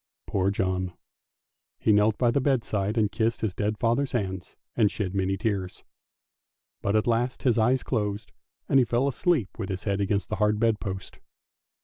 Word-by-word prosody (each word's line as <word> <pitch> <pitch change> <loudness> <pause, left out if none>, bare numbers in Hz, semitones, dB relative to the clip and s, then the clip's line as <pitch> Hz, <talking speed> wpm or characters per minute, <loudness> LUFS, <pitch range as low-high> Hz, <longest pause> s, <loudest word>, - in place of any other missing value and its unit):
Poor 95 0 +1
John! 95 -2 -1 0.8
he 110 - +3
knelt 105 +1 +3
by 120 -2 +3
the 140 - +1
bedside 115 -6 0
and 105 -2 +2
kissed 115 +1 0
his 110 -4 -1
dead 105 +2 -1
father's 125 +4 +1
hands 95 -6 -3 0.2
and 110 -4 +4
shed 95 -3 -3
many 95 0 0
tears; 95 -4 -3 1.0
but 100 +1 0
at 110 - +3
last 120 +2 0
his 120 -3 +3
eyes 125 +4 +2
closed, 105 -3 -2 0.4
and 135 - +4
he - - +5
fell 120 +3 +1
asleep 140 - +1
with 100 - -3
his 95 0 -4
head 100 -1 0
against 100 0 0
the - - -2
hard 105 0 +2
bed 115 -1 +2
post. 95 -3 -6
105 Hz, 175 wpm, -26 LUFS, 100-120 Hz, 1.0 s, he